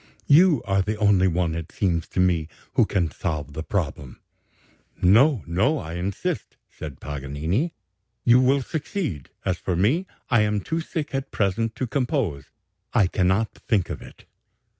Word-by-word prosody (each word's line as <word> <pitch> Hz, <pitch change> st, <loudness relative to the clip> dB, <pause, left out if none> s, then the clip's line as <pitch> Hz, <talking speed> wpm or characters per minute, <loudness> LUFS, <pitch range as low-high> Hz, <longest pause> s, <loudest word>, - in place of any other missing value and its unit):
You 155 Hz, -3 st, +5 dB
are 95 Hz, -1 st, +2 dB
the 105 Hz, +3 st, -2 dB
only 100 Hz, -3 st, +4 dB
one, 85 Hz, -2 st, 0 dB
it 80 Hz, 0 st, -5 dB
seems 85 Hz, -4 st, 0 dB
to -, -, -4 dB
me, 90 Hz, -4 st, +2 dB, 0.3 s
who -, -, +4 dB
can 85 Hz, -5 st, 0 dB
solve 75 Hz, -4 st, -4 dB
the 80 Hz, -, -4 dB
problem.' 75 Hz, -8 st, -3 dB, 0.8 s
'No, 115 Hz, -, +5 dB
no; 100 Hz, -, +1 dB
I 80 Hz, -, -6 dB
insist,' 90 Hz, +3 st, -3 dB
said 75 Hz, -5 st, -8 dB
Paganini; 75 Hz, -, -2 dB, 0.5 s
'you 120 Hz, +1 st, +6 dB
will 135 Hz, +1 st, +3 dB
succeed; 145 Hz, -, -4 dB, 0.2 s
as 90 Hz, -3 st, 0 dB
for 90 Hz, -, -1 dB
me, 130 Hz, -, +2 dB, 0.2 s
I 120 Hz, -3 st, +4 dB
am 105 Hz, -1 st, +1 dB
too 165 Hz, +7 st, -2 dB
sick 160 Hz, -3 st, -4 dB
at 135 Hz, 0 st, -2 dB
present 110 Hz, +3 st, 0 dB
to 130 Hz, -, -2 dB
compose; 120 Hz, -, -1 dB, 0.5 s
I 100 Hz, -, +5 dB
cannot 95 Hz, +4 st, +1 dB
think 100 Hz, -6 st, +1 dB
of -, -, -5 dB
it.' -, -, -14 dB
100 Hz, 160 wpm, -24 LUFS, 85-130 Hz, 0.8 s, you